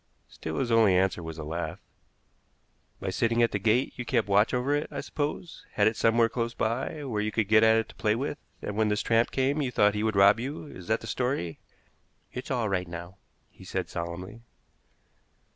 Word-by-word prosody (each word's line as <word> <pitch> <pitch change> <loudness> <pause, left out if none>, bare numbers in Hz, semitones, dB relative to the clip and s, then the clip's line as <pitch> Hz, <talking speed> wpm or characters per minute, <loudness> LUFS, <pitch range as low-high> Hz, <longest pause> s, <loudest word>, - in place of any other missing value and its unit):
Still 80 0 -6
his 125 -3 -1
only 110 -5 +5
answer 95 -1 +2
was 80 -1 -7
a 80 - -5
laugh. 80 +3 -4 1.2
"By 95 - -3
sitting 115 +5 +2
at 115 - +2
the 105 - -1
gate 110 +6 +2
you 125 - -3
kept 120 -3 0
watch 100 +2 +4
over 130 +3 0
it, 145 +1 0
I - - -5
suppose? 155 +3 -4
Had 105 - +3
it 110 +1 +3
somewhere 115 +1 +3
close 115 0 -3
by, 125 +7 -2
where 115 -6 -2
you 105 +1 -1
could 110 -2 0
get 110 +1 +6
at 110 0 +6
it 115 - -1
to - - -12
play 105 -1 +1
with; 140 +4 -3 0.2
and 105 - -4
when 110 0 +2
this 105 0 0
tramp 115 0 +3
came 135 +3 0
you 135 - 0
thought 105 -4 +3
he 105 - -2
would 110 -1 0
rob 100 +2 +6
you. 140 +6 -5
Is 90 - -11
that 110 - +1
the - - -8
story?" 125 - -2 0.7
"It's 125 - -6
all 120 -5 0
right 95 -2 -1
now," 85 +3 -8 0.3
he - - -16
said - - -3
solemnly. 90 +6 -6
110 Hz, 210 wpm, -28 LUFS, 100-125 Hz, 1.2 s, get